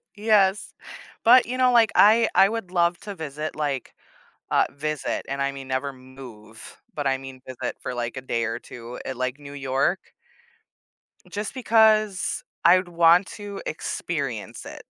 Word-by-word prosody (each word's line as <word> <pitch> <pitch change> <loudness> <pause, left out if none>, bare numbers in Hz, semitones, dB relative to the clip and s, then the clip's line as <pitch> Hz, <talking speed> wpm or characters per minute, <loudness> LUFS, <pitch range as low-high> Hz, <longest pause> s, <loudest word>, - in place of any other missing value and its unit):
Yes. 210 -2 +2 0.5
But, 245 +2 +7
you 250 +2 -4
know, 255 -1 +4
like, 230 -3 +4
I 220 +3 +6
I 195 - +6
would 225 -4 -4
love 175 -1 +2
to 205 -2 -7
visit, 155 -1 -5
like, 145 -4 -3 0.6
uh, - - +4
visit, 150 +2 -3
and 140 0 -2
I 140 0 -1
mean 135 -1 -9
never 130 +2 -2
move, 125 -4 -13
but 145 -2 -3
I 135 -1 +1
mean 135 -1 -10
visit 130 -2 -5
for, - - -5
like, 120 +1 -4
a - - -3
day 115 -2 -1
or 115 0 -3
2 120 0 -10
at, 130 - -5
like, 130 +2 -3
New 145 -1 -11
York 140 +6 -1 1.2
just 205 0 -5
because 220 -5 +2 0.2
I'd 180 +1 +5
want 170 +2 +5
to 205 -1 -7
experience 140 -7 -4
it. - - -10
150 Hz, 160 wpm, -24 LUFS, 130-200 Hz, 1.2 s, But